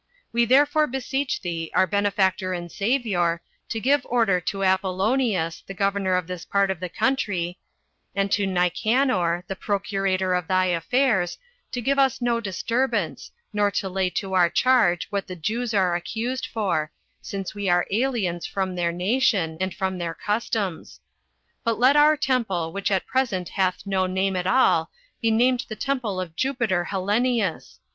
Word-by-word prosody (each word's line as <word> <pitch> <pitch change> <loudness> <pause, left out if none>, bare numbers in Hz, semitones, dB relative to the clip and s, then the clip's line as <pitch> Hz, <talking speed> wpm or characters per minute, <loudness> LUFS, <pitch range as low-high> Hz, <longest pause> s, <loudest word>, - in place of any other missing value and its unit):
We 235 0 +3
therefore 290 +5 +4
beseech 270 +2 -2
thee, 165 -3 -4
our - - +5
benefactor 190 -1 +1
and 175 -1 -5
Savior, 200 -7 0 0.3
to 225 - -2
give 275 +4 +2
order 225 -7 +2
to 195 +3 -3
Apollonius, 190 -1 +1
the 195 - -7
governor 195 -1 +1
of 180 -1 0
this 180 -1 -6
part 200 -1 +1
of 190 - -5
the 180 0 -4
country, 185 -7 -1 0.6
and 200 0 0
to 200 -1 +2
Nicanor, 180 0 +1
the 195 - -5
procurator 195 -2 -1
of 180 -2 -1
thy 185 0 +2
affairs, 190 +1 +1 0.4
to 245 - -2
give 275 +3 +1
us 270 -2 +3
no 240 -1 +1
disturbance, 230 +6 -1 0.2
nor 205 -1 +2
to 200 -1 -2
lay 185 0 0
to 190 +1 -4
our 180 -2 +4
charge 230 -7 +3
what 200 -1 -2
the 185 - -6
Jews 225 +8 -2
are 185 -5 +2
accused 230 +9 -3
for, 175 -8 -1 0.3
since 195 -2 -5
we 205 -2 -2
are 175 0 +3
aliens 210 -7 0
from 190 -2 -2
their 175 -1 0
nation, 185 -2 +1
and 190 0 0
from 190 0 -3
their 170 -1 -3
customs; 210 -4 -3 0.6
but 230 -2 0
let 255 +4 +5
our 300 +1 +6
temple, 220 - 0
which 200 +1 -1
at 190 -2 0
present 205 -9 -1
hath 190 -1 -1
no 190 -1 +1
name 190 +1 0
at 180 0 -1
all 255 +5 +3 0.3
be 230 - +2
named 245 +2 +2
the 215 - -4
Temple 250 -7 -2
of 170 -3 -5
Jupiter 235 -8 0
Hellenius. 205 +1 -1
195 Hz, 165 wpm, -24 LUFS, 180-235 Hz, 0.6 s, our